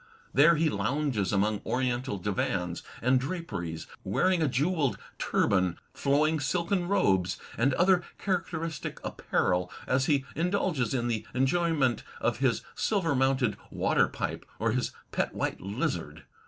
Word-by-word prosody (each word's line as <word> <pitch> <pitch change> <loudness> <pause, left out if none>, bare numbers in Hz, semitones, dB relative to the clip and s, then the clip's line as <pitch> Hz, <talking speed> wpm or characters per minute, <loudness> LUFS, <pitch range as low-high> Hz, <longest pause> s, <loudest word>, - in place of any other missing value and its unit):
There 150 +6 +6
he 160 +1 +2
lounges 120 - 0
among 105 +1 +1
oriental 125 -3 -1
divans 90 -2 -1 0.2
and 130 +2 +4
draperies, 125 - -4 0.2
wearing 185 -2 +2
a 155 - +3
jewelled 145 +1 +1 0.2
turban, 95 -3 +2 0.2
flowing 150 +3 +2
silken 175 +5 0
robes, 95 - +2 0.2
and 130 +4 +2
other 180 +1 +4 0.2
characteristic 165 -4 -3
apparel, 90 0 0
as 130 +1 +1
he 140 -3 +2
indulges 170 - 0
in 120 -2 0
the 115 -3 -2
enjoyment 135 -2 +2 0.2
of 120 0 0
his 130 -4 +1
silver 190 -8 +1
mounted 130 -4 +2
water - - +2
pipe - - -4
or - - +1
his - - 0 0.2
pet - - -1
white - - -2
lizard. 100 +2 -3
135 Hz, 130 wpm, -29 LUFS, 110-165 Hz, 0.2 s, There